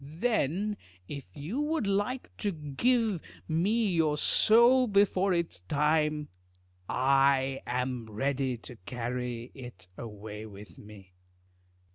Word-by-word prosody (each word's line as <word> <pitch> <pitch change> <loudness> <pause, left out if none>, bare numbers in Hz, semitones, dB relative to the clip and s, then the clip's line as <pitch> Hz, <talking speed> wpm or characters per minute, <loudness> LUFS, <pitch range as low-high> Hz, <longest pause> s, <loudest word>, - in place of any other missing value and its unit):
Then 195 - -1 0.3
if 140 -1 -7
you 165 - -4
would 305 -4 0
like 205 +6 -1
to 205 - -1
give 195 - 0 0.3
me 200 +6 +1
your 155 -3 +2
soul 235 - +5
before 200 -2 +3
its 170 - -1
time, 150 - +1 0.6
I 135 0 +3
am 125 -2 -2
ready 130 +3 -1
to 125 - -10
carry 125 0 -4
it 120 -8 -11
away 105 -1 -7
with 100 -4 -12
me. 100 -3 -14
145 Hz, 110 wpm, -29 LUFS, 125-200 Hz, 0.6 s, soul